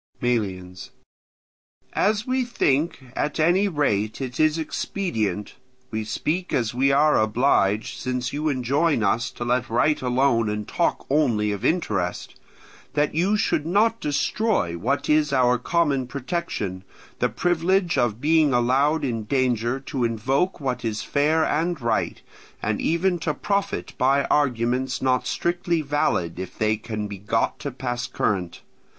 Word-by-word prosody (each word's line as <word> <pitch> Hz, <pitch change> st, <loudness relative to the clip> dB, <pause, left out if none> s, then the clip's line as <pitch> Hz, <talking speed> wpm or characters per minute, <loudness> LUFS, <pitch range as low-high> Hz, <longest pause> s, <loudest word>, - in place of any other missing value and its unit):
Melians. 95 Hz, -7 st, -2 dB, 1.0 s
As 210 Hz, +2 st, +1 dB
we 255 Hz, 0 st, 0 dB
think, 145 Hz, -, 0 dB
at 150 Hz, -, -2 dB
any 175 Hz, +6 st, +3 dB
rate, 110 Hz, -, 0 dB
it 130 Hz, -2 st, -5 dB
is 155 Hz, 0 st, +3 dB
expedient—we 130 Hz, -, -4 dB
speak 175 Hz, +11 st, -2 dB
as 115 Hz, -3 st, 0 dB
we 135 Hz, +3 st, +2 dB
are 150 Hz, +2 st, +4 dB
obliged, 110 Hz, -2 st, +1 dB
since 125 Hz, 0 st, -3 dB
you 150 Hz, +2 st, -1 dB
enjoin 140 Hz, +1 st, +1 dB
us 115 Hz, +5 st, +1 dB
to 120 Hz, -, -6 dB
let 120 Hz, 0 st, 0 dB
right 150 Hz, +6 st, +2 dB
alone 125 Hz, -3 st, +2 dB
and 105 Hz, 0 st, -3 dB
talk -, -, 0 dB
only 115 Hz, -8 st, +2 dB
of 100 Hz, +1 st, -4 dB
interest—that 140 Hz, -, -3 dB
you 185 Hz, +7 st, +2 dB
should 155 Hz, -6 st, 0 dB
not 220 Hz, +6 st, +2 dB
destroy 145 Hz, -, 0 dB
what 130 Hz, +11 st, -1 dB
is 150 Hz, -1 st, +3 dB
our 125 Hz, -2 st, +3 dB
common 140 Hz, -3 st, +1 dB
protection, 125 Hz, -, -4 dB, 0.4 s
the -, -, +2 dB
privilege 175 Hz, +1 st, +1 dB
of 115 Hz, -2 st, +1 dB
being 155 Hz, 0 st, +3 dB
allowed 135 Hz, +5 st, +2 dB
in 115 Hz, -4 st, -2 dB
danger 125 Hz, 0 st, 0 dB
to 135 Hz, -2 st, -3 dB
invoke 130 Hz, -, 0 dB
what 130 Hz, -3 st, -3 dB
is 110 Hz, -2 st, -2 dB
fair 155 Hz, +2 st, +2 dB
and 165 Hz, +2 st, 0 dB
right, 115 Hz, -3 st, -1 dB, 0.4 s
and -, -, -2 dB
even 175 Hz, +2 st, +1 dB
to 155 Hz, -2 st, -2 dB
profit 200 Hz, +4 st, -2 dB
by 135 Hz, +2 st, +3 dB
arguments 125 Hz, -2 st, +1 dB
not 130 Hz, -1 st, +1 dB
strictly 175 Hz, -2 st, -1 dB
valid 115 Hz, -, 0 dB
if 95 Hz, -1 st, -7 dB
they 110 Hz, 0 st, +2 dB
can 105 Hz, -1 st, -5 dB
be 100 Hz, -2 st, -8 dB
got 110 Hz, +3 st, -1 dB
to 145 Hz, -, -4 dB
pass 120 Hz, -2 st, -4 dB
current. 90 Hz, -5 st, -2 dB
130 Hz, 140 wpm, -24 LUFS, 115-155 Hz, 1.0 s, are